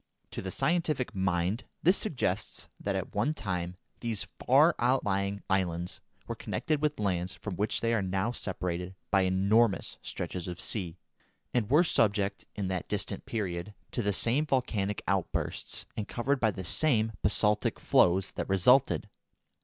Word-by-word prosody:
To -, -, -5 dB
the 95 Hz, -, -4 dB
scientific 155 Hz, -, 0 dB
mind 95 Hz, +3 st, 0 dB, 0.2 s
this 180 Hz, +4 st, +6 dB
suggests 120 Hz, -, -1 dB
that -, -, -2 dB
at -, -, -4 dB
one 150 Hz, +4 st, +1 dB
time 90 Hz, -, -3 dB, 0.2 s
these 115 Hz, -4 st, -1 dB, 0.2 s
far 150 Hz, +7 st, +6 dB
outlying 100 Hz, -6 st, +1 dB
islands 90 Hz, -2 st, -1 dB, 0.3 s
were -, -, -3 dB
connected 155 Hz, -2 st, -2 dB
with 150 Hz, -3 st, 0 dB
lands 95 Hz, -2 st, -1 dB
from 100 Hz, -4 st, -6 dB
which 105 Hz, +4 st, 0 dB
they 115 Hz, 0 st, +1 dB
are 115 Hz, -, +2 dB
now 95 Hz, +4 st, 0 dB
separated 90 Hz, -4 st, -3 dB, 0.2 s
by 95 Hz, -, +5 dB
enormous 100 Hz, +3 st, +2 dB
stretches 90 Hz, -1 st, -5 dB
of 90 Hz, 0 st, -5 dB
sea, 90 Hz, -6 st, -1 dB, 0.6 s
and 115 Hz, -4 st, +1 dB
were 150 Hz, +6 st, +6 dB
subject, 100 Hz, -, +1 dB
in 100 Hz, -3 st, -2 dB
that 95 Hz, -1 st, -3 dB
distant 100 Hz, -1 st, -2 dB
period, 100 Hz, -2 st, -3 dB, 0.2 s
to 120 Hz, -, -1 dB
the 105 Hz, -2 st, +1 dB
same 125 Hz, +9 st, +2 dB
volcanic 105 Hz, -7 st, 0 dB
outbursts -, -, -1 dB
and 105 Hz, -, -3 dB
covered 135 Hz, +3 st, 0 dB
by 110 Hz, -, +3 dB
the 95 Hz, -3 st, -5 dB
same 115 Hz, -, +2 dB
basaltic 105 Hz, 0 st, +2 dB
flows 95 Hz, +2 st, +3 dB
that -, -, -4 dB
resulted. 95 Hz, -, +4 dB
105 Hz, 155 wpm, -30 LUFS, 95-120 Hz, 0.6 s, this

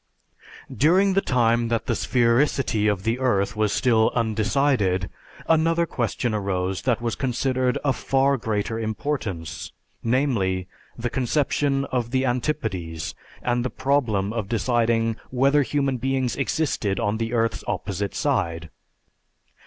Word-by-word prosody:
During 185 Hz, +7 st, +4 dB
the 195 Hz, -, +3 dB
time 120 Hz, -4 st, +2 dB
that 115 Hz, -1 st, -1 dB
the -, -, 0 dB
sphericity 120 Hz, -2 st, +2 dB
of 95 Hz, -2 st, -4 dB
the 115 Hz, +4 st, 0 dB
earth 100 Hz, -5 st, +1 dB
was 105 Hz, -1 st, +1 dB
still 115 Hz, -3 st, +3 dB
undecided, 110 Hz, -4 st, +1 dB, 0.4 s
another 165 Hz, +1 st, +3 dB
question 120 Hz, -4 st, -2 dB
arose 95 Hz, -2 st, -1 dB
that 120 Hz, -1 st, +1 dB
was 115 Hz, -2 st, 0 dB
considered 130 Hz, +2 st, 0 dB
of 130 Hz, -5 st, +1 dB
far 135 Hz, +3 st, +2 dB
greater 110 Hz, -1 st, -2 dB
importance, 110 Hz, -, -4 dB, 0.3 s
namely, 115 Hz, -8 st, 0 dB, 0.3 s
the 120 Hz, 0 st, -3 dB
conception 140 Hz, +1 st, 0 dB
of 120 Hz, -2 st, -1 dB
the 130 Hz, +1 st, +1 dB
antipodes 100 Hz, -, -2 dB, 0.3 s
and 120 Hz, 0 st, +1 dB
the 130 Hz, -, -1 dB
problem 120 Hz, -8 st, 0 dB
of 110 Hz, -4 st, -3 dB
deciding 115 Hz, 0 st, +1 dB
whether 135 Hz, +3 st, +3 dB
human 140 Hz, -1 st, 0 dB
beings 130 Hz, 0 st, -1 dB
existed 135 Hz, -8 st, -1 dB
on 105 Hz, +2 st, 0 dB
the 115 Hz, 0 st, -2 dB
earth's 115 Hz, -1 st, 0 dB
opposite 100 Hz, 0 st, -3 dB
side. 85 Hz, -1 st, -1 dB
120 Hz, 130 wpm, -24 LUFS, 105-135 Hz, 0.4 s, During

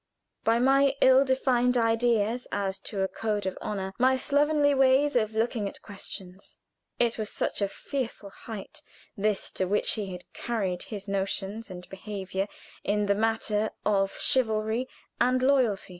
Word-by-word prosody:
by 225 Hz, +1 st, +3 dB
my 275 Hz, +2 st, +4 dB
ill 260 Hz, +1 st, +6 dB
defined 255 Hz, -2 st, +2 dB
ideas 230 Hz, 0 st, +2 dB
as 195 Hz, -1 st, -2 dB
to 195 Hz, 0 st, -3 dB
a -, -, +1 dB
code 205 Hz, +1 st, -2 dB
of 190 Hz, -, -2 dB
honor 190 Hz, -2 st, -3 dB
my 260 Hz, +1 st, +4 dB
slovenly 290 Hz, +1 st, +3 dB
ways 270 Hz, +1 st, +4 dB
of 220 Hz, -2 st, +1 dB
looking 220 Hz, -2 st, 0 dB
at -, -, -12 dB
questions? 195 Hz, -2 st, -9 dB, 0.4 s
It 235 Hz, -1 st, +1 dB
was 215 Hz, -1 st, -2 dB
such -, -, -2 dB
a 200 Hz, -, +2 dB
fearful 230 Hz, -3 st, -5 dB
height, 225 Hz, +9 st, -8 dB, 0.3 s
this 210 Hz, -1 st, -1 dB
to 190 Hz, -, -1 dB
which 205 Hz, +3 st, +2 dB
he 210 Hz, -3 st, -2 dB
had 180 Hz, -1 st, -7 dB
carried 195 Hz, -7 st, -2 dB
his 205 Hz, -2 st, -6 dB
notions 195 Hz, +2 st, -2 dB
and 180 Hz, -1 st, -9 dB
behavior 195 Hz, 0 st, -4 dB, 0.4 s
in 210 Hz, 0 st, +1 dB
the 200 Hz, -, +3 dB
matter 220 Hz, 0 st, 0 dB, 0.2 s
of 195 Hz, -2 st, +1 dB
chivalry 220 Hz, 0 st, +1 dB, 0.3 s
and 255 Hz, +1 st, +3 dB
loyalty. 255 Hz, -9 st, +2 dB
220 Hz, 155 wpm, -28 LUFS, 200-250 Hz, 0.4 s, ill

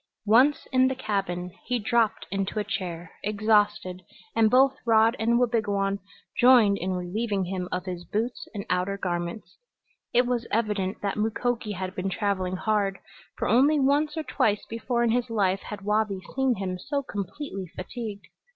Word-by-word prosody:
Once 250 Hz, +8 st, +4 dB
in 260 Hz, -1 st, +4 dB
the 265 Hz, -, -1 dB
cabin 195 Hz, -7 st, -2 dB
he 250 Hz, -, 0 dB
dropped 230 Hz, 0 st, +1 dB
into 195 Hz, +2 st, -2 dB
a 210 Hz, -, +1 dB
chair, 175 Hz, -4 st, -5 dB
exhausted, 210 Hz, -3 st, +1 dB, 0.3 s
and 220 Hz, -1 st, +5 dB
both 265 Hz, +3 st, +5 dB
Rod 225 Hz, 0 st, +4 dB
and 235 Hz, +1 st, +3 dB
Wabigoon 205 Hz, -5 st, +1 dB, 0.4 s
joined 240 Hz, -5 st, +6 dB
in 185 Hz, +1 st, -2 dB
relieving 195 Hz, +3 st, -1 dB
him 180 Hz, 0 st, -4 dB
of 180 Hz, 0 st, -2 dB
his 180 Hz, -2 st, -5 dB
boots 225 Hz, +7 st, -3 dB
and 200 Hz, -, -4 dB
outer 180 Hz, +2 st, 0 dB
garments. 175 Hz, +1 st, -4 dB, 0.5 s
It 245 Hz, +1 st, +4 dB
was 240 Hz, -1 st, -1 dB
evident 210 Hz, -4 st, -1 dB
that 200 Hz, +1 st, -1 dB
Mukoki 225 Hz, +1 st, -1 dB
had 185 Hz, 0 st, -4 dB
been 190 Hz, +1 st, -2 dB
traveling 190 Hz, -2 st, -1 dB
hard, 200 Hz, -1 st, 0 dB, 0.4 s
for -, -, -1 dB
only 280 Hz, +7 st, +4 dB
once 290 Hz, +3 st, +2 dB
or 315 Hz, -, -1 dB
twice 220 Hz, -6 st, 0 dB
before 235 Hz, +1 st, -1 dB
in 235 Hz, -, +2 dB
his 245 Hz, +1 st, 0 dB
life 195 Hz, -4 st, +1 dB
had 205 Hz, -1 st, -8 dB
Wabi 210 Hz, -2 st, +1 dB, 0.2 s
seen 265 Hz, -2 st, +2 dB
him 185 Hz, -2 st, -4 dB
so 280 Hz, +6 st, -2 dB
completely 200 Hz, -, -5 dB
fatigued. 210 Hz, +1 st, -6 dB
210 Hz, 160 wpm, -26 LUFS, 190-240 Hz, 0.5 s, joined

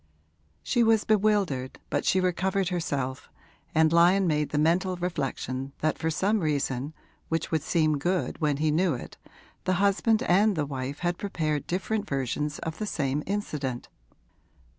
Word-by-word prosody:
She 240 Hz, -, +1 dB
was 225 Hz, -2 st, +4 dB
bewildered, 200 Hz, -11 st, +1 dB
but -, -, 0 dB
she 190 Hz, -, +3 dB
recovered 185 Hz, +1 st, 0 dB
herself, 140 Hz, -7 st, -3 dB, 0.5 s
and 160 Hz, 0 st, +4 dB
Lyon 180 Hz, +3 st, +5 dB
made 150 Hz, -3 st, +1 dB
the 150 Hz, -, -2 dB
mental 175 Hz, +5 st, +2 dB
reflection 135 Hz, -6 st, -3 dB
that 155 Hz, 0 st, 0 dB
for 160 Hz, -, 0 dB
some 200 Hz, +7 st, +1 dB
reason 145 Hz, -3 st, -1 dB, 0.3 s
which 165 Hz, -1 st, -1 dB
would 160 Hz, -2 st, +1 dB
seem 155 Hz, -2 st, +1 dB
good 180 Hz, +3 st, -1 dB
when 150 Hz, -2 st, +1 dB
he 155 Hz, +1 st, +1 dB
knew 165 Hz, -1 st, +2 dB
it -, -, -9 dB, 0.5 s
the 185 Hz, -, +2 dB
husband 200 Hz, +4 st, +2 dB
and 200 Hz, +3 st, +3 dB
the 150 Hz, -3 st, 0 dB
wife 140 Hz, 0 st, -5 dB
had 175 Hz, -1 st, -1 dB
prepared 155 Hz, -7 st, -2 dB
different 205 Hz, +4 st, -2 dB
versions 140 Hz, +2 st, -2 dB
of 160 Hz, -1 st, -5 dB
the 215 Hz, -, -2 dB
same 140 Hz, -4 st, -1 dB
incident. 150 Hz, -11 st, -3 dB
165 Hz, 155 wpm, -27 LUFS, 145-190 Hz, 0.5 s, Lyon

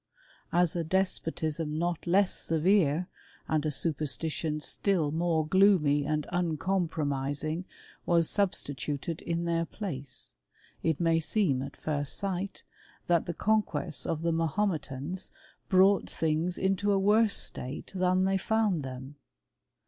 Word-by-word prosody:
As 175 Hz, -1 st, +2 dB
a 170 Hz, -, 0 dB
des 190 Hz, +4 st, +3 dB, 0.2 s
potism 160 Hz, -1 st, -3 dB
not 175 Hz, 0 st, -2 dB
less 190 Hz, +2 st, +3 dB
severe, 165 Hz, 0 st, +2 dB, 0.4 s
and 155 Hz, -2 st, +1 dB
a -, -, +1 dB
superstition 155 Hz, +1 st, -1 dB
still 165 Hz, -1 st, 0 dB
more 165 Hz, -1 st, +1 dB
gloomy 155 Hz, -6 st, +4 dB
and 150 Hz, -1 st, 0 dB
uncompromising, 160 Hz, -3 st, -1 dB, 0.4 s
was 170 Hz, -2 st, +4 dB
substituted 150 Hz, -, -2 dB
in 170 Hz, 0 st, -2 dB
their 165 Hz, 0 st, +1 dB
place, 140 Hz, -, -6 dB, 0.5 s
it 160 Hz, -3 st, 0 dB
may 165 Hz, -1 st, +3 dB
seem 160 Hz, -4 st, +1 dB
at 135 Hz, -, -7 dB
first 145 Hz, -2 st, -1 dB
sight, 195 Hz, 0 st, -3 dB, 0.4 s
that 170 Hz, -2 st, +2 dB
the 170 Hz, -, -3 dB
conquests 180 Hz, -8 st, 0 dB
of 160 Hz, 0 st, -2 dB
the 170 Hz, -, +2 dB
Mahometans 165 Hz, -2 st, -2 dB, 0.4 s
brought 190 Hz, 0 st, +4 dB
things 165 Hz, +2 st, -1 dB
into 195 Hz, +2 st, +1 dB
a 200 Hz, -, +3 dB
worse 210 Hz, +2 st, +4 dB
state 130 Hz, +3 st, -4 dB
than 185 Hz, 0 st, +2 dB
they 195 Hz, 0 st, +2 dB
found 215 Hz, -5 st, +1 dB
them. 130 Hz, +2 st, -8 dB
165 Hz, 125 wpm, -29 LUFS, 150-185 Hz, 0.5 s, gloomy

